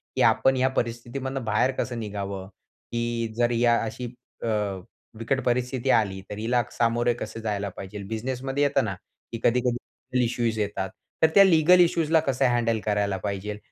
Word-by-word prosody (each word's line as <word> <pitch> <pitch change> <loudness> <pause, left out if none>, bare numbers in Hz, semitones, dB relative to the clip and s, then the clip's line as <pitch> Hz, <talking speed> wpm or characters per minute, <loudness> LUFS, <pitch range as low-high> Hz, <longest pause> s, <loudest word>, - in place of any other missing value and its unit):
की - - +1
आपण 135 0 +4
या 130 +1 +3
परिस्थितीमधनं 130 +2 -3
बाहेर 110 +5 +2
कसं 120 -2 -2
निघावं? 100 -3 -5
की 120 +3 -4
जर 120 0 +2
या 120 0 +3
अशी 115 +3 -5 0.4
अ, - - -1 0.7
बिकट 130 +4 -1
परिस्थिती 125 +1 0
आली, 100 -4 +2
तर 105 - -6
हिला 120 +2 +1
सामोरे 120 +1 +1
कसं 110 +1 -6
जायला 100 -2 -2
पाहिजे. 100 +1 -7
बिझनेसमध्ये 130 +5 -2
येत 140 - +3
ना, - - -3 0.4
की 115 - -4
कधी-कधी 120 0 +2
लीगल 125 0 -4
इश्यूज 115 -2 -1
येतात. 100 -2 -2 0.3
तर - - +9
त्या 200 - +10
लीगल 180 -1 +6
इश्यूजला 165 -2 +4
कसं 135 -3 +1
हँडल 115 -2 +1
करायला 105 -2 0
पाहिजे. 100 +1 -4
120 Hz, 160 wpm, -26 LUFS, 105-130 Hz, 0.7 s, त्या